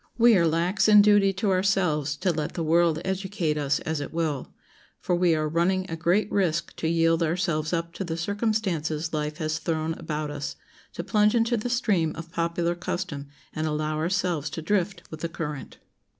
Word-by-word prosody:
We 235 -1 +6
are 170 -3 +4
lax 170 +7 +1
in 210 -1 +8
duty 205 -1 +5
to 195 +1 0
ourselves 180 -7 +1
to 185 - +1
let 155 -2 -3
the 170 - -2
world 165 0 +3
educate 190 -4 -1
us 145 -1 0
as 160 -2 -2
it 145 - -5
will, 160 -5 -2 0.5
for - - -1
we 175 -1 +3
are 155 0 0
running 175 +4 +1
a - - -1
great 175 +6 +1
risk 170 -4 0
to 160 - -2
yield 165 0 +2
ourselves 165 -2 0
up 170 -1 -2
to 195 - -4
the 165 -3 -4
circumstances 170 -6 -1
life 150 0 -2
has 155 0 -2
thrown 160 -1 -1
about 150 -1 -3
us, 145 -1 -5 0.4
to - - -5
plunge 210 +1 +3
into 230 +1 +2
the 235 +2 -2
stream 205 -10 +1
of 165 0 -8
popular 170 +1 0
custom 175 -4 -4 0.3
and 155 0 -2
allow 155 0 -1
ourselves 170 -3 0
to 160 +2 -6
drift 195 +2 0
with 160 - -7
the 170 - -3
current. 150 -4 -6
170 Hz, 190 wpm, -26 LUFS, 155-190 Hz, 0.5 s, in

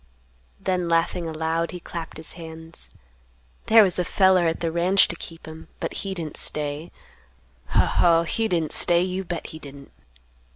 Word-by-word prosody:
Then 180 -2 -1
laughing 165 +1 +1
aloud, 160 +1 -1
he 180 - -7
clapped 165 -2 -7
his 160 - -8
hands; 160 -1 -10 0.8
"There 225 0 +8
was 185 -2 0
a - - +2
feller 185 -1 +4
at 165 - -1
the 165 -1 -1
ranch 180 +4 +4
to - - -3
keep 165 -1 -10
'em, 160 0 -10
but - - -3
he 195 -1 -4
didn't 160 -4 -5
stay; 150 +2 -2 0.8
Ho! - - +3
Ho! 170 -1 +4
he 225 +6 0
didn't 165 -6 0
stay, 175 0 +3
you 185 +1 -2
bet 175 -2 -5
he 160 - -8
didn't. 140 -1 -12
170 Hz, 170 wpm, -24 LUFS, 160-180 Hz, 0.8 s, There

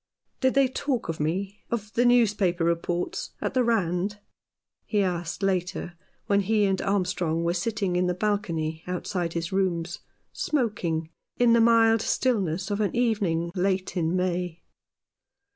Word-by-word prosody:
" - - -48
Did 260 -1 +2
they 275 -1 +5
talk 255 - -2
of 165 - -3
me 190 +7 -2
— - - -43
of 215 -2 -3
the 245 - +2
newspaper 210 -8 +3
reports 170 +1 -1
— - - -43
at - - -2
the 255 -1 +3
Rand? 200 -3 0 0.4
" - - -65 0.3
he 205 -2 +2
asked, 175 0 -3
later, 180 -2 -1 0.3
when 200 0 +3
he 210 +1 +2
and 190 -1 +1
Armstrong 180 -4 0
were 170 0 +1
sitting 195 0 -1
in 180 0 +2
the 180 - 0
balcony 170 -6 -1
outside 180 -1 -2
his 170 0 -3
rooms, 180 -2 -1 0.3
smoking, 175 - -1 0.3
in 240 -1 +5
the 235 - +5
mild 225 -1 +5
stillness 195 -8 0
of 205 +1 0
an 205 - 0
evening 200 -9 +1
late 190 0 0
in 170 -1 0
May. 180 -2 -2
190 Hz, 160 wpm, -26 LUFS, 170-215 Hz, 0.4 s, they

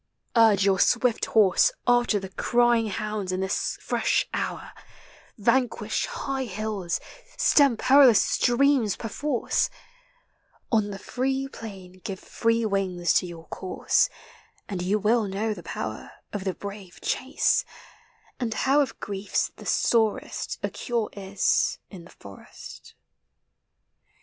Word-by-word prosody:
Urge 215 -4 +5
your 190 -1 +3
swift 240 +1 +2
horse 200 -5 +4
After 240 -3 +3
the 190 -1 -8
crying 240 +3 +2
hounds 210 -1 -3
in 185 - -2
this 190 0 -1
fresh - - 0
hour; - - -3 0.7
Vanquish 240 +3 0
high 270 -1 -3
hills, 205 -4 -3 0.4
stem 280 -6 +4
perilous 260 -4 +6
streams 250 -3 +2
per 225 - -6
force, 280 +2 -1 1.0
On 215 -3 +2
the 200 - -6
free 265 +5 -2
plain 190 -7 -10
give 190 -2 -5
five 230 -2 0
wings 185 -3 +1
in 180 - -6
your 165 -1 -11
cour» 185 - -7 0.8
And 190 -3 -4
you 190 +4 +1
will 215 +2 +2
know 210 +3 -2
the 185 - -10
|>o\\< - - -7 0.2
r - - -14 0.2
Of 205 -2 -4
the 190 - -1
brave 200 -3 -9
chase,— 265 - +1 0.8
and 230 -3 -2
how 275 +2 +3
of 280 - -3
griefs 200 0 -2
tli<' - - -11
sorest 220 -3 0
A - - -1
cure 235 -4 -2
is 195 0 0
in 175 -4 -11
(he - - -18
forest. 100 -1 -13
215 Hz, 130 wpm, -26 LUFS, 195-240 Hz, 1.0 s, perilous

